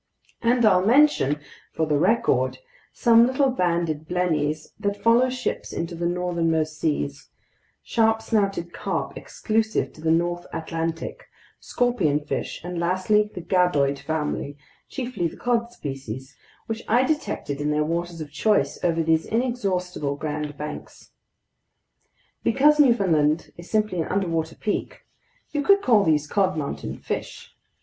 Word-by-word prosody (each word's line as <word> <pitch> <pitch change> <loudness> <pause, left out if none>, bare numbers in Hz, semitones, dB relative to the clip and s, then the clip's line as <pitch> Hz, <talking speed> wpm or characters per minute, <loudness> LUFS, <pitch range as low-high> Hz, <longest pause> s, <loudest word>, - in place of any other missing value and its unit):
And 240 0 +3
I'll 185 -4 +5
mention—for 175 - +2
the 150 -2 +1
record—some 185 - +2
little 265 +1 +2
banded 170 - -1
blennies 155 -4 -1
that 200 -1 -1
follow 235 +4 +4
ships 255 0 -3
into 170 +1 -4
the 170 0 -2
northernmost 165 -3 0
seas, 70 - -2 0.5
sharp 225 -1 +2
snouted 195 -6 0
carp - - -3
exclusive 220 0 -1
to - - -14
the 160 - 0
north 175 +2 +1
Atlantic, 165 0 -4 0.3
scorpionfish, 165 -17 -1
and 175 0 -4
lastly 185 +5 +2
the 180 - -7
gadoid 150 -7 +2
family, 150 -2 -3 0.3
chiefly 245 -9 -2
the - - -10
cod 235 -1 0
species, 135 - -7 0.3
which 225 0 -4
I 240 +4 +4
detected 260 - -2
in 150 - 0
their 150 0 +1
waters 170 +1 -3
of 150 -2 -7
choice 145 -3 +1
over 165 -2 +2
these 160 0 +2
inexhaustible 190 - -1
Grand 150 0 -4
Banks. 150 0 -8 1.3
Because 295 +6 +4
Newfoundland 170 - +3
is 170 +1 -12
simply 215 -5 +1
an - - -3
underwater 165 -5 -1
peak, 210 - -3 0.5
you 295 - 0
could 400 +6 +4
call 220 -5 +5
these 150 -3 +2
cod 190 +1 +1
mountain 145 -2 -4
fish. - - -6
175 Hz, 130 wpm, -24 LUFS, 155-220 Hz, 1.3 s, I'll